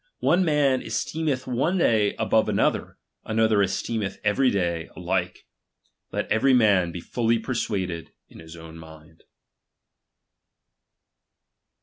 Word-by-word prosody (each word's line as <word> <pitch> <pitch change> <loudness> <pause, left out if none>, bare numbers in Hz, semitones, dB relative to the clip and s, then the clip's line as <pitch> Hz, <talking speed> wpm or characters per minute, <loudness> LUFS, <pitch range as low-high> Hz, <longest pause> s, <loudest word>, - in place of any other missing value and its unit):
One 185 - +3
man 145 -5 +2
esteemeth 130 +5 -2
one 135 +9 0
day 110 - +2
above - - +1
another, - - 0 0.3
another 110 -1 +2
esteemeth 100 +1 -2
every 125 +6 +2
day 85 -5 -2
alike. 90 0 -3 0.7
Let - - -3
every 130 +5 +4
man 100 -7 +3
he - - -4
fully 115 +5 0
persuaded 100 -8 -3 0.2
in - - -15
his 80 +1 -12
ovm 80 0 -11
mind. 80 0 -15
105 Hz, 110 wpm, -24 LUFS, 90-125 Hz, 0.7 s, every